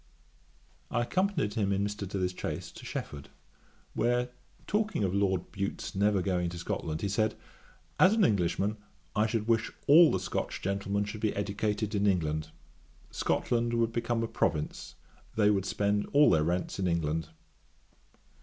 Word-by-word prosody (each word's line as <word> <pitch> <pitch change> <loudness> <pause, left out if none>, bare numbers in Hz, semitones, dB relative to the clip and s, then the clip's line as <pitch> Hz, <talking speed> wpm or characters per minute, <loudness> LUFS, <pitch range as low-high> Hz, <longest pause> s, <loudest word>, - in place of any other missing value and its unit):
I 120 -1 0
accompanied 180 - 0
him 100 -2 0
in 100 0 +1
Mr. 105 -1 -4
Dilly's 90 -1 -2
chaise - - -4
to - - -12
Shefford, 70 -1 -6 0.6
where 120 +1 +1 0.4
talking 215 - 0
of 95 -2 0
Lord 95 -3 0
Bute's 100 -1 -4
never 100 -1 +2
going 90 -2 0
to 85 - -7
Scotland, 80 -2 -3
he - - 0
said, 110 +2 +1 0.6
'As 185 +3 +7
an 215 -4 +4
Englishman, 100 - +1 0.4
I 110 +1 +3
should 110 -1 -2
wish 115 -1 +2
all 160 +3 +8
the 95 - 0
Scotch 95 - -3
gentlemen 100 +1 -1
should 105 +1 -7
be 110 -2 0
educated 105 +1 -1
in 100 0 +2
England; 80 -4 0 0.6
Scotland 120 0 0
would 115 -1 +1
become 115 0 -1
a - - -1
province; 75 -7 -2 0.4
they 105 -1 +4
would 95 -2 0
spend 100 +1 0
all 145 +1 +6
their 80 -2 +4
rents 90 +3 -1
in 95 - +1
England.' 80 -1 -1
100 Hz, 155 wpm, -30 LUFS, 95-115 Hz, 0.6 s, all